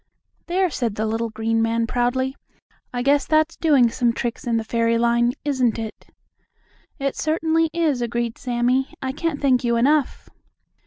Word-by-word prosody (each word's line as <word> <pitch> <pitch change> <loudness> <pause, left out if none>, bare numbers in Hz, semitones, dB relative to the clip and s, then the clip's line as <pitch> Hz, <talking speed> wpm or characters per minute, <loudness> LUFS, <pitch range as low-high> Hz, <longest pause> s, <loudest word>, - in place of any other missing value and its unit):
"There," 365 0 +1
said 235 -7 -2
the 215 - -1
little 225 +1 -1
green 225 +1 -1
man 230 0 +1
proudly, 250 +3 -1 0.6
"I 245 0 -2
guess 280 +1 +2
that's 310 +1 +2
doing 275 -8 +3
some 240 -1 +1
tricks 240 +1 -4
in 230 -1 +1
the 225 - -1
fairy 230 +1 +1
line, 235 +1 +2
isn't 255 -6 +1
it?" 220 -1 -7 0.9
"It 275 -2 -2
certainly 320 +1 +1
is," 320 -6 0
agreed 235 -1 -2
Sammie, 250 +2 0
"I 260 - -1
can't 300 +1 -3
thank 260 -3 +2
you 235 -1 +1
enough." 280 +4 +1
245 Hz, 160 wpm, -22 LUFS, 230-285 Hz, 0.9 s, doing